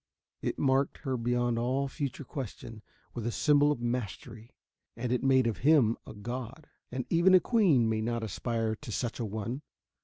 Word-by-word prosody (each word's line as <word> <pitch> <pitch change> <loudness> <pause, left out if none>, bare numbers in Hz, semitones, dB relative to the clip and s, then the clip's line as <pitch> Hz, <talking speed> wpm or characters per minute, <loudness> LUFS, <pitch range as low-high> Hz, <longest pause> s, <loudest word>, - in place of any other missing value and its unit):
It - - -2
marked 135 0 +2
her 135 -3 -1
beyond 120 0 0
all 130 +4 0
future 140 0 -4
question 115 -5 -7 0.3
with 120 -2 -4
a - - 0
symbol 145 +3 +4
of 145 - -2
mastery. 120 -1 -4 0.5
And 120 +1 -2
it 125 - +1
made 130 -2 +4
of 115 -2 -1
him 135 -5 +4
a - - -8
god. 125 +6 -6 0.3
And 130 0 -3
even 175 +3 +6
a - - +8
queen 175 - +3
may 110 -1 0
not 115 +1 -2
aspire 115 +1 -2
to 115 - -9
such 120 +3 -3
an 115 -3 -2
one. 110 +6 -4
120 Hz, 180 wpm, -30 LUFS, 115-135 Hz, 0.5 s, a